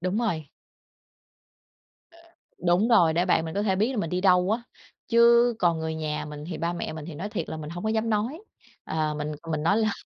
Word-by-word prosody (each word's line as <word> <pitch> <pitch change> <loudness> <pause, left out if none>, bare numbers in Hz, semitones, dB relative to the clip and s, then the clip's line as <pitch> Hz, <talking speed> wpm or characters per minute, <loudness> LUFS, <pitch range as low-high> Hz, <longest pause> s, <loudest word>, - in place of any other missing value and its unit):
đúng 185 +5 -1
rồi. 170 -11 -1 2.2
Đúng 180 +6 +3
rồi, 175 -9 +5
để 175 +2 +1
bạn 165 -2 +2
mình 160 +2 -6
có 200 - 0
thể 190 -3 +1
biết 220 +6 +1
là - - -5
mình 165 -6 -2
đi 180 0 -1
đâu 180 -1 +4
á, 230 +2 0 0.5
chứ 235 0 +5
còn 170 -4 +2
người 160 0 -3
nhà 155 -1 -3
mình 150 -1 -8
thì 165 - -5
ba 170 +1 -1
mẹ 170 -2 -4
mình 155 -1 -7
thì 170 - -8
nói 185 +8 -5
thiệt 170 - -4
là - - -4
mình 155 0 -7
hổng 175 +4 -6
có - - +1
dám 225 +1 0
nói, 230 - -1 0.4
à, 155 -1 -1
mình 150 0 -3 0.2
mình 155 -1 -1
nói 200 +6 +3
là 215 -2 +2
180 Hz, 225 wpm, -26 LUFS, 160-215 Hz, 2.2 s, rồi